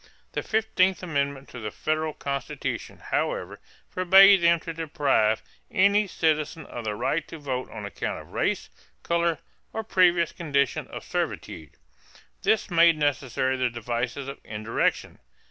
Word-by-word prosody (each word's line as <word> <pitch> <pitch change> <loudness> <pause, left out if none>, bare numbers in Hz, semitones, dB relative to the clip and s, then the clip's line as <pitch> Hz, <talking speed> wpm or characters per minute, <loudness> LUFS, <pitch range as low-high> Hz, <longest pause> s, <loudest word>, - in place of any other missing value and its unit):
The - - -2
fifteenth 205 -4 +1
amendment 140 -4 -2
to 125 - -9
the 110 -2 -4
federal 155 +6 -2
Constitution, 140 +1 -4
however, - - -1 0.3
forbade 190 +1 +7
them 170 0 +4
to 165 - -6
deprive 145 -9 +1 0.3
any 200 +2 +3
citizen 155 -2 0
of 120 -2 -7
the 105 -1 -2
right 160 +9 -1
to 165 - -8
vote 130 -4 -4
on 105 - -7
account 100 - -4
of - - -13
race, - - -1 0.3
color, 170 -1 +1 0.4
or 220 - -3
previous 175 -4 +3
condition 140 -6 0
of - - -8
servitude. 80 -4 -4 0.7
This 210 -1 +1
made 170 -1 +5
necessary 130 -3 0
the 130 -1 +1
devices 120 +3 -3
of 140 - -7
indirection. 110 +1 -2
150 Hz, 140 wpm, -26 LUFS, 130-170 Hz, 0.7 s, forbade